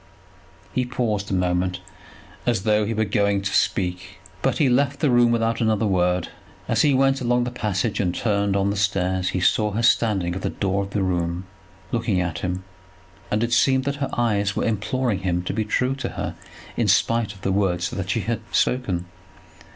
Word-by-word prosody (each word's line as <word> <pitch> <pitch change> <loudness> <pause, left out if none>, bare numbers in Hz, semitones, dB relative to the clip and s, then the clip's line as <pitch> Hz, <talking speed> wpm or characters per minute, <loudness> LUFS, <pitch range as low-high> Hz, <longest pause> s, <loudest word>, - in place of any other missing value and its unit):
He 130 - +1
paused 110 -5 -2
a - - -2
moment 90 0 0 0.7
as 115 -6 +1
though 105 0 +2
he 115 - -2
were 110 +1 +1
going 100 -1 +1
to 100 - -2
speak, 90 +1 0 0.2
but - - +1
he 150 - +3
left 140 +3 +2
the 150 -5 +2
room 120 -1 +5
without 115 0 0
another 110 -1 +2
word. 90 -2 +1 0.4
As - - +2
he 145 -3 +4
went 135 0 +2
along 120 0 +2
the 120 - -3
passage 105 -3 -1
and 90 -3 0
turned 100 -3 0
on 100 0 +1
the - - -2
stairs 95 -2 0
he 95 - -1
saw 105 +3 +2
her 115 +3 -1
standing 100 -7 +2
at 95 - -5
the - - -1
door 100 0 -1
of 100 - -4
the 100 -1 -1
room, 90 0 -1 0.5
looking 115 -5 0
at 85 -3 -2
him, 90 +1 -3 0.7
and 105 +2 +1
it 120 0 0
seemed 130 +1 +3
that 140 +1 -2
her 140 -1 -2
eyes 105 -4 +1
were - - 0
imploring 115 0 0
him 90 -2 -1
to - - -3
be 110 +1 0
true 125 +5 0
to 130 - -3
her - - -4 0.4
in - - +1
spite 115 -3 +2
of 95 - -16
the 95 - 0
words 95 -3 0
that 95 -1 -4
she 115 - +1
had 115 +4 -2
spoken. 100 -9 0
105 Hz, 200 wpm, -23 LUFS, 95-120 Hz, 0.7 s, room